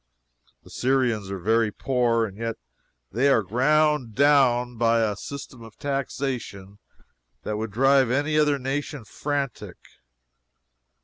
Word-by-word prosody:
The - - -16
Syrians 120 -6 0
are 100 - -4
very 110 +4 +1
poor, 120 -2 +1
and 100 -3 -8
yet 115 +1 -4 0.6
they 125 +7 +2
are 115 -6 +3
ground 135 - +1
down 130 -4 +3
by 115 0 +2
a 105 -2 0
system 130 +2 -9
of 115 -1 -13
taxation 130 -8 -4 0.6
that 105 - -3
would 110 +1 -3
drive 135 +3 +3
any 145 +4 0
other 150 -2 +3
nation 140 0 -4
frantic. 140 +2 -4
125 Hz, 125 wpm, -24 LUFS, 110-140 Hz, 0.6 s, are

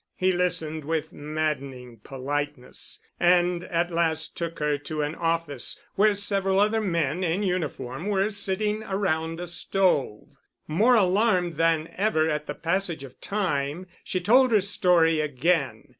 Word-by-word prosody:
He 185 0 +2
listened 160 -4 -1
with 160 +1 -2
maddening 140 -5 -4
politeness 135 +2 -4 0.2
and 175 0 +3
at 175 +1 -1
last 160 -2 0
took 170 -1 -4
her 150 -1 0
to 150 +1 -3
an 145 +1 -2
office 165 -5 -2
where 210 +1 +3
several 195 -1 0
other 215 +2 +2
men 170 -3 0
in 180 +4 0
uniform 170 -4 -3
were 200 0 +1
sitting 210 +1 -2
around 165 -6 -1
a 175 - -5
stove. 170 - 0 0.4
More 220 +11 +4
alarmed 185 -3 +2
than 165 -1 +2
ever 185 -6 +2
at 150 -1 -2
the - - -4
passage 170 -2 -1
of 130 -2 -13
time, 175 -5 -2 0.2
she 185 - -2
told 245 +7 +4
her 215 -3 +5
story 180 -5 +3
again. 150 +1 0
170 Hz, 145 wpm, -26 LUFS, 150-190 Hz, 0.4 s, her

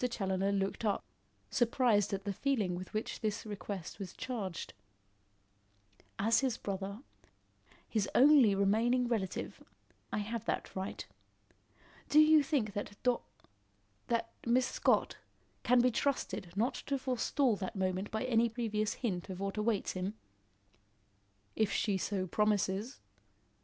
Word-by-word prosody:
Challoner 195 -3 0
looked 195 +2 -1
up, 205 -2 0 0.5
surprised 235 -4 +3
at 195 -1 -2
the 200 0 -2
feeling 220 -6 0
with 180 +1 -6
which 215 +1 -3
this 215 -1 -2
request 200 -3 -6
was 190 -3 -6
charged. 205 -9 -5 1.4
"As 225 +3 +3
his 260 -4 0
brother 200 +2 -4 0.9
his 210 -3 0
only 265 -7 +7
remaining 230 +6 +2
relative, 215 -6 -3 0.5
I - - -1
have 220 +2 -3
that - - -3
right. 190 +1 -4 1.0
Do 300 - +6
you 310 0 +7
think 265 -8 0
that 205 0 -4
Dor 250 -2 +2 0.9
that 230 -1 0
Miss 245 +2 +3
Scott, - - +1 0.4
can 245 0 +4
be 250 +1 +3
trusted 240 -8 -1
not 230 +6 +1
to 280 - +1
forestall 255 -1 +1
that 190 0 -5
moment 190 +1 -1
by 220 +2 -2
any 235 -2 +3
previous 215 -2 -1
hint 185 -3 -2
of 185 -1 -6
what 195 0 -3
awaits 215 -1 0
him?" 185 +3 -3 1.4
"If 215 -2 +1
she 200 -3 +1
so 190 0 -1
promises. 210 +4 0
215 Hz, 130 wpm, -33 LUFS, 195-240 Hz, 1.4 s, only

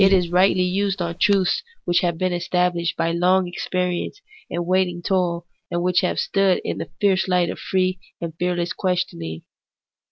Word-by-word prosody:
It 195 - +6
is 180 -3 +2
rightly 185 +1 +4
used 195 +2 0
on 170 0 -3
truths 200 - +3 0.2
which 175 0 +3
have 170 -2 0
been 185 +1 0
established 175 -1 0
by 165 0 +1
long 180 +2 +3
experience 180 - -2 0.3
and 170 0 -2
waiting 180 -1 +1
toil, 175 -2 0 0.2
and 175 0 -1
which 180 0 +3
have 180 - -1
stood 195 -2 +2
in - - -2
the - - -5
fierce 195 -2 +2
light 180 -2 +2
of - - -8
free 185 -1 0 0.2
and 165 -1 -5
fearless 175 -1 0
questioning. 175 - -2
180 Hz, 170 wpm, -22 LUFS, 175-185 Hz, 0.3 s, It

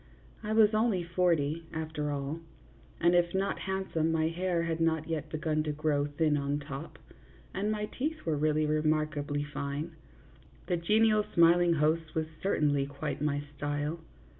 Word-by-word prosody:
I 210 - -4
was 215 -1 +5
only 215 -4 +2
forty, 165 -3 +1
after 155 -2 -3
all, 145 +2 -3 0.6
and 175 +1 +4
if 175 0 +2
not 195 +1 0
handsome, 190 -4 -1
my 160 0 +1
hair 175 0 -1
had 165 -1 -2
not 160 -1 +1
yet 155 -2 -3
begun 155 0 -1
to 155 0 -2
grow 145 -1 0
thin 150 0 +1
on 140 0 -1
top, 140 +2 -7 0.6
and 205 +2 -1
my 210 0 -1
teeth 305 +8 -4
were 160 -2 +1
really 155 +1 +2
remarkably 150 -1 0
fine; 145 +2 -4 0.7
the 180 - 0
genial 215 +4 +3
smiling 170 +1 +6
host 155 +1 0
was 160 -1 +1 0.2
cer 195 - +1
tainly 145 -2 +2
quite 140 0 -4
my 145 -1 0
style. 145 +3 -2
160 Hz, 160 wpm, -30 LUFS, 150-175 Hz, 0.7 s, smiling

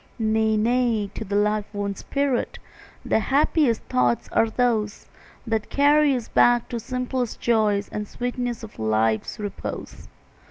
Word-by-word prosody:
Nay, 220 -1 +1
nay, 230 -2 +1
to - - -5
the 200 -1 -4
life 210 0 +1
worn 205 -1 -2
spirit 275 +3 -2 0.5
The - - +2
happiest 275 0 +2
thoughts 125 -1 +1
are 225 - +2
those 220 -3 0 0.4
That 220 -2 -2
carry 290 0 +4
us 240 -3 -4
back 240 -1 +3
to 240 - -3
the 225 - -7
simple 250 0 -2
joys 215 -3 +1
And 210 0 -5
the - - -22
sweetness 245 -1 -3
of 215 - -11
life's 110 - 0
repose. 205 -2 -6
220 Hz, 150 wpm, -24 LUFS, 210-245 Hz, 0.5 s, carry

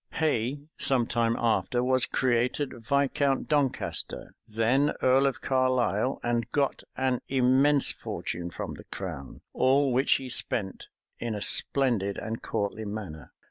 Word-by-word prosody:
Hay, 140 -3 0 0.2
some 130 -3 +3
time 115 -1 0
after, 120 +1 +1
was 130 0 +3
created 125 +3 0
Viscount 140 +3 0
Doncaster, 140 -4 -1
then 120 +7 +2
earl 135 +2 +4
of 130 -1 -3
Carlisle, 130 -2 +1
and 120 -1 -1
got 140 0 0 0.2
an 130 -2 0
immense 135 +2 +3
fortune 85 0 -5
from - - -6
the - - -11
crown, 80 -8 -7
all 135 +1 +3
which 130 +3 +3
he 135 - -2
spent 95 -5 -3 0.3
in 115 -2 -3
a 105 - -5
splendid 115 -8 +2
and 110 +1 -5
courtly 105 +2 -3
manner. 100 -7 -7
125 Hz, 135 wpm, -27 LUFS, 110-135 Hz, 0.3 s, earl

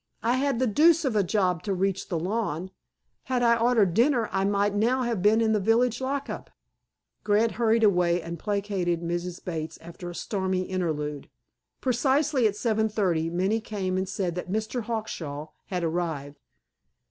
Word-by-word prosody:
I 240 +3 +2
had 275 -2 +1
the 260 - +2
deuce 320 +8 +4
of 255 -5 0
a 210 - +4
job 180 -3 +1
to 200 -2 -2
reach 195 +1 -1
the 175 - -1
lawn. 185 -1 -2 0.5
Had 250 -2 0
I 235 -1 +5
ordered 230 -6 +3
dinner 235 - +3
I 195 0 +1
might 200 0 +1
now 240 +5 +2
have 235 -6 -1
been 215 +3 +4
in 220 -1 +2
the 215 - +2
village 235 +4 +2
lockup." 275 +1 -3 0.7
Grant 215 +2 +3
hurried 230 -1 +2
away, 180 -4 +3
and 170 -1 -6
placated 195 -4 -1
Mrs. 175 +1 -4
Bates 160 -3 -4
after 170 +2 -9
a 175 - -8
stormy 190 -2 -1
interlude. 150 -6 -3 0.5
Precisely 265 +1 +2
at 205 - -2
7.30 215 -4 +1
p. 160 0 -1
m. 170 +1 -4
Minnie 200 +5 +1
came 195 -4 -3
and 190 0 -1
said 185 -2 -2
that 180 +1 -5
"Mr. 220 +4 -2
Hawkshaw" 165 -10 -4 0.2
had 180 -2 -2
arrived. 160 -4 -3
200 Hz, 170 wpm, -26 LUFS, 175-230 Hz, 0.7 s, I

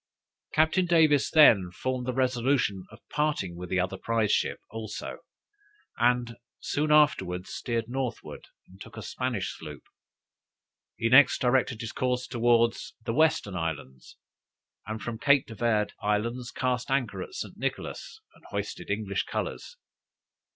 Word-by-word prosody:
Captain 160 +4 +2
Davis 155 -5 +4
then 110 - +6
formed 125 +7 -3
the - - +1
resolution 125 -5 0
of 110 - -17
parting 150 - -1
with 90 +1 -7
the 95 - +1
other 95 +1 -1
prize 115 -2 0
ship - - 0
also, 110 -1 -6 0.8
and 120 -1 +1 0.2
soon 150 +1 -1
afterwards 95 -9 +2
steered 115 -1 -2
northward, 130 0 -5 0.2
and 95 +1 -18
took - - -11
a - - -6
Spanish - - -3
sloop. 75 -3 -10 1.1
He 115 - 0
next 130 +3 +6
directed 125 -2 +1
his 115 - -5
course 125 0 -1
towards 115 -1 +1
the 115 - -1
western 145 -9 +2
islands, 80 -6 -5 0.7
and 110 +1 -4
from 115 -1 -5
Cape 140 0 +4
de 115 - -10
Verd 110 -2 0
islands 115 +4 -1
cast 125 -2 -2
anchor 135 -2 -1
at 375 - -8
St. - - -6
Nicholas, 440 - -5
and - - -22
hoisted - - -5
English - - -1
colors. - - -5
120 Hz, 140 wpm, -28 LUFS, 105-130 Hz, 1.1 s, then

